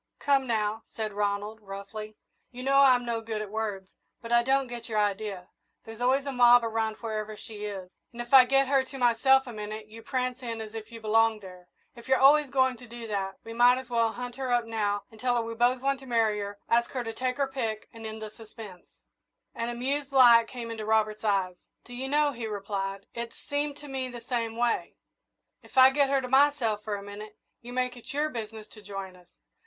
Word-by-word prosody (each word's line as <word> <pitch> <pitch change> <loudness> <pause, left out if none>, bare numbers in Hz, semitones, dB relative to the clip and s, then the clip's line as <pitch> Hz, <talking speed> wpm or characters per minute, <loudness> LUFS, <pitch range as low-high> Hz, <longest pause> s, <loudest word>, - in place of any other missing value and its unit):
"Come 275 -2 +2
now," 220 -1 0
said 215 -2 -3
Ronald, 205 +1 -2
roughly; 210 +2 -8 0.3
"you 250 0 -9
know 275 +1 +4
I'm 255 -3 +5
no 230 -1 -2
good 220 -1 -4
at 210 -2 -6
words, 205 -3 -4 0.3
but 230 - -9
I 235 0 +5
don't 270 +2 +2
get 240 -2 -8
your 215 - -2
idea. 205 -3 -1 0.4
There's 225 +1 -10
always 265 +3 +2
a 280 - -2
mob 245 -1 +6
around 225 -1 -1
wherever 215 -2 -4
she 210 -1 -8
is, 195 -3 -6 0.2
and 235 - -13
if 240 +2 -6
I 260 -2 +10
get 270 +1 +3
her 270 -1 +3
to 270 +1 -10
myself 265 +2 +4
a 245 - -8
minute 215 0 -7
you 225 +1 -11
prance 255 +2 -2
in 230 -2 -5
as 220 -1 -7
if 225 0 -8
you 230 -1 -9
belonged 220 0 +3
there. 180 -2 -12 0.3
If 235 +1 -13
you're 265 0 +4
always 285 +1 +6
going 260 -1 +2
to 245 - -13
do 235 0 -8
that, 195 -2 -2
we 225 - -8
might 245 +2 +5
as 255 -1 -11
well 230 -1 +2
hunt 245 0 -6
her 260 -2 -3
up 240 -1 +2
now, 205 -3 -1 0.2
tell 245 0 +1
her 235 - +1
we 230 0 -5
both 245 +2 +2
want 275 0 +1
to 265 - -13
marry 225 -3 +2
her, 205 0 -5
ask 235 0 +2
her 255 -2 -2
to 225 -1 -5
take 255 +2 -2
her 280 -1 +1
pick, 230 -5 -4
and 225 -1 -11
end 220 0 -6
the 215 - -7
suspense." 215 -4 -12 0.7
An 230 0 -3
amused 275 +4 -2
light 240 -4 +7
came 235 -2 -7
into 220 -1 -5
Robert's 215 0 +1
eyes. 190 -4 0 0.3
"Do 245 - -12
you 260 +2 -4
know," 295 0 +3
he 235 -4 -5
replied, 195 -1 -4
"it's 235 0 -6
seemed 285 0 -3
to 295 - -11
me 265 -2 -3
the 240 -1 -9
same 230 -2 -2
way. 240 -1 0 0.7
If - - -16
I 260 0 +9
get 280 0 +2
her 275 -1 +2
to 255 - -5
myself 265 -6 +3
for 210 -1 -2
a 200 - -7
minute, 210 +1 -9 0.2
you 240 +1 -10
make 250 0 -1
it 240 - -10
your 300 +1 +1
business 220 -4 -7
to 215 - -13
join 195 -2 -7
us. 180 -1 -20
230 Hz, 225 wpm, -28 LUFS, 215-255 Hz, 0.7 s, I